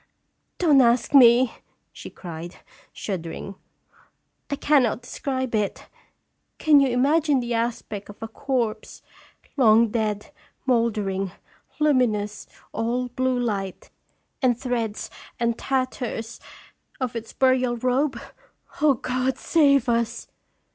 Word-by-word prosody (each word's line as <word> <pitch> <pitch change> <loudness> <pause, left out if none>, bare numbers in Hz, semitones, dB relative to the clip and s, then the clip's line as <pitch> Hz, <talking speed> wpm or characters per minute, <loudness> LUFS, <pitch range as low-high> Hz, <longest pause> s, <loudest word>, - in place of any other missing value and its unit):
" - - -50
Don't 300 -6 +5
ask 240 +1 +2
me!" 245 -2 +7 0.4
she - - -9
cried, 170 0 -8 0.4
shuddering. 185 0 -5 0.5
" - - -41
I 285 - -1
cannot 265 -5 +2
describe 260 0 -3
it. 210 -3 -2 0.7
Can 300 -2 +5
you 275 - +4
imagine 280 +3 +2
the 240 -1 -3
aspect 230 -3 -3
of 205 - -9
a - - -3
corpse, 230 -3 -3 0.5
long 230 -3 +5
dead, 215 0 -2 0.3
mouldering, 210 -6 0 0.5
luminous, 235 -8 +1 0.2
all 245 +2 -2
blue 255 +1 0
light, 200 -6 -3 0.5
and 245 -3 +2
threads 235 -4 -3 0.3
and 235 0 +1
tatters 255 -4 -3 0.6
of 255 -3 -3
its 230 -1 -6
burial 255 -2 +2
robe? 255 +2 0 0.6
O 295 -3 +5
God, 255 +2 -1
save 280 -6 +3
us!" 235 0 -1
240 Hz, 115 wpm, -24 LUFS, 220-260 Hz, 0.7 s, me